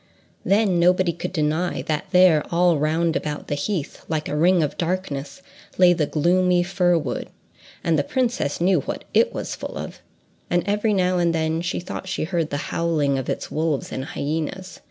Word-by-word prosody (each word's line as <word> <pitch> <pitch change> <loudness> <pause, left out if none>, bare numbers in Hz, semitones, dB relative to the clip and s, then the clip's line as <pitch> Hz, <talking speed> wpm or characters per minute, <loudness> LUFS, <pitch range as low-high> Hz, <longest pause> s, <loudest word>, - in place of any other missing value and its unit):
Then 200 -3 +2
nobody 180 0 +3
could 170 - -5
deny 160 +1 -1
that 155 -1 -2
there, 180 -5 +5
all 170 -2 +3
round 160 +2 +1
about 150 -1 -4
the - - 0
heath, 150 +2 -3
like 155 -1 -1
a - - -3
ring 175 +2 +4
of 150 - -2
darkness, 170 -2 -3 0.3
lay 180 -1 +6
the 160 -4 0
gloomy 180 +3 +2
fir 180 -1 +2
wood, 150 -5 -4 0.5
and 165 -2 +2
the - - +1
princess 240 - -1
knew 180 0 +3
what - - -5
it - - +4
was - - -4
full - - -6
of, - - -7 0.5
and 175 -1 +1
every 210 +2 +1
now 180 -1 +2
and 170 -1 +2
then 160 0 0
she 175 +1 -2
thought 180 +1 -7
she 180 - -2
heard 165 -1 -1
the 145 - -2 0.2
howling 150 -5 +1
of 130 - -5
its - - -3
wolves 155 -2 -1
and 130 - -4
hyenas. 160 +7 -4
170 Hz, 185 wpm, -23 LUFS, 155-180 Hz, 0.5 s, lay